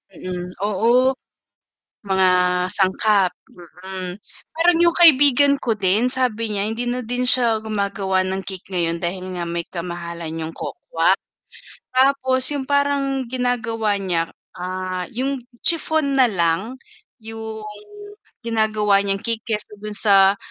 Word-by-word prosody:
Mm, 180 0 -7
oo. 235 +6 +2 1.0
Mga 190 -1 +2 0.4
sangkap, 190 -1 +1 0.2
mm. 180 +1 -8 0.4
Parang 335 +1 +3
'yung 340 0 +3
kaibigan 285 -4 +6
ko 230 -4 -1
din 205 +4 +1
sabi 230 -4 -1
niya 200 - -1
hindi 240 +2 -4
na 250 +1 -2
din 245 +2 -2
siya 235 -3 +5
gumagawa 200 -3 -1
ng 190 +1 -3
cake 190 -1 -7
ngayon 170 -2 -1
dahil 185 +2 -4
nga 175 - -4
may 170 0 -4
kamahalan 170 -1 -6
'yung 160 0 -6
cocoa - - -1 0.8
Tapos 260 0 +2
'yung 275 -2 -4
parang 280 -2 0
ginagawa 230 -4 -1
niya, 175 -4 -2 0.3
ah, 185 0 -5
'yung 265 +2 -3 0.2
chiffon 315 -4 +4
na 250 - +5
lang, 185 +6 -1 0.4
'yung 220 -1 -8 0.8
ginagawa 215 -3 +1
niyang 195 0 -2
cake 230 -1 -1
kesa 215 -1 -2
dun 210 0 -4
sa 195 -2 +4
215 Hz, 125 wpm, -20 LUFS, 185-255 Hz, 1.0 s, kaibigan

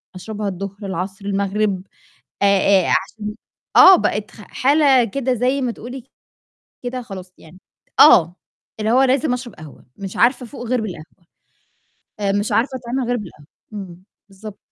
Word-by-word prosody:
أشربها 210 +2 -5
الضهر، 195 +1 -5
العصر، 190 +2 -5
المغرب، 200 -1 -1 0.6
آآ - - +5 0.4
آآ، - - -1
عشان 210 +2 -2 0.4
آه، 380 0 +10
بقِت 210 -1 -2
خ 210 - -14
حالة 275 +1 +3
كده 255 +3 -2
زي 255 +3 0
ما 245 -2 -1
تقولي 245 +2 -9 0.8
كده 250 0 -4
خلاص 190 -5 -10
يعني 160 +4 -16 0.4
آه، 175 +1 +7 0.4
اللي 215 +1 0
هو 260 +2 +5
لازم 265 +1 +2
أشرب 245 -4 -7
قهوة، 155 -2 -14
مش 195 -1 -7
عارفة 250 +1 +2
أفوق 245 0 -9
غير 250 -2 +1
بالقهوة. 170 -2 -9 0.9
آآ، 200 -1 0
مش 205 +1 -1
عارفة 260 +3 0
أتعامِل 245 +1 -3
غير 245 - +1
بالقهوة، 170 -9 -10 0.3
امم، 185 -4 -9 0.3
بالضبط. 200 +1 -11
210 Hz, 150 wpm, -20 LUFS, 195-250 Hz, 0.9 s, آه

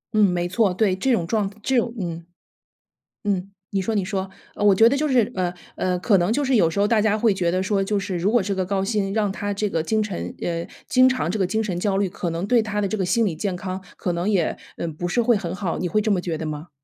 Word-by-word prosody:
嗯， 215 - +5
没 175 -1 0
错， 200 +2 +2
对， 195 -2 +2
这 260 +8 0
种 185 -9 +2
状 205 -1 0
这 265 - +1
种 235 -1 +1
嗯。 170 -3 -4 1.0
嗯， 195 -2 -1 0.2
你 195 - 0
说 225 +4 -1
你 205 -3 +1
说， 195 -1 -2 0.3
呃， - - -3
我 205 - +7
觉 225 +4 +6
得 280 - +1
就 305 +2 +1
是， 245 -5 +2
呃， 180 -2 -1 0.2
呃， 180 -1 -1
可 200 +2 +3
能 180 +4 +1
就 290 +4 +1
是 265 -1 +2
有 195 -7 +5
时 180 - -3
候 205 - +4
大 225 0 +3
家 210 0 +2
会 225 0 +4
觉 180 -3 0
得 185 +1 0
说， 195 +1 +1
就 205 +1 0
是 190 -2 -3
如 185 +5 +1
果 240 -1 +4
这 195 +1 -2
个 190 -1 -1
高 190 +1 0
薪 195 -1 -1
让 210 -2 +1
他 205 +1 -3
这 205 +1 -1
个 165 -4 -1
精 215 +6 +1
陈 205 -4 -4
呃， 170 -1 -2 0.2
经 255 0 +5
常 255 - -1
这 - - -1
个 195 - +2
精 220 +5 0
神 185 -5 -2
焦 195 0 0
虑， 195 -1 +1
可 180 -1 -4
能 170 +4 -3
对 240 +1 +4
他 210 -1 -2
的 200 - +1
这 215 - -2
个 190 - 0
心 210 +6 +2
理 180 -6 -1
健 185 +3 -2
康 185 +1 -5
可 180 - -2
能 170 +3 -2
也 190 -6 +1 0.4
不 175 - -2
是 240 +7 +1
会 235 0 +3
很 175 -3 -4
好， 190 -3 -2
你 180 - -1
会 215 +5 +1
这 215 - -1
么 200 -3 +2
觉 170 -2 -3
得 160 - -5
吗？ 155 +3 -6
195 Hz, 305 characters per minute, -23 LUFS, 180-215 Hz, 1.0 s, 我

